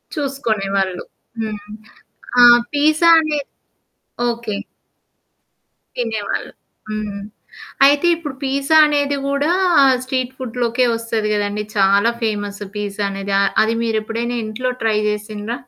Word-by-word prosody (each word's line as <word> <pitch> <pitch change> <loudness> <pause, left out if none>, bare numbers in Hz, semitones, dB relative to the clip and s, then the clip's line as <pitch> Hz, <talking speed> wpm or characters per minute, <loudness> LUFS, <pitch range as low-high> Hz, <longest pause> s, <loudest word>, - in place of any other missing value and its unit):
చూసుకునేవాళ్ళు. 205 - -2 0.4
హ్మ్. 215 -2 -4 0.8
ఆ! - - +8 0.3
పిజ్జా 310 +3 +3
అనే 310 -2 -1 0.9
ఓకే. 230 -3 -4 1.4
తినేవాళ్ళు. 225 -4 -3 0.4
హ్మ్. 210 -2 -4 0.7
అయితే 290 +4 +3
ఇప్పుడు 295 -5 -7
పీజ్జా 275 +3 +1
అనేది 285 -1 0
కూడా 280 +3 0 0.5
స్ట్రీట్ 255 -1 -2
ఫుడ్‌లోకే 245 0 -1
వస్తది 230 -2 -2
కదండీ! 205 0 -2
చాలా 200 +3 +4
ఫేమస్ 205 -2 -3 0.2
పీజ్జా 205 0 -3
అనేది. 195 0 -5
ఆహ్, 200 - +2
అది 225 +1 +1
మీరేప్పుడైనా 230 +2 -2
ఇంట్లో 240 +4 -3
ట్రై 220 -1 +1
చేసిండ్ర? 210 +1 -4
225 Hz, 105 wpm, -19 LUFS, 210-265 Hz, 1.4 s, ఆ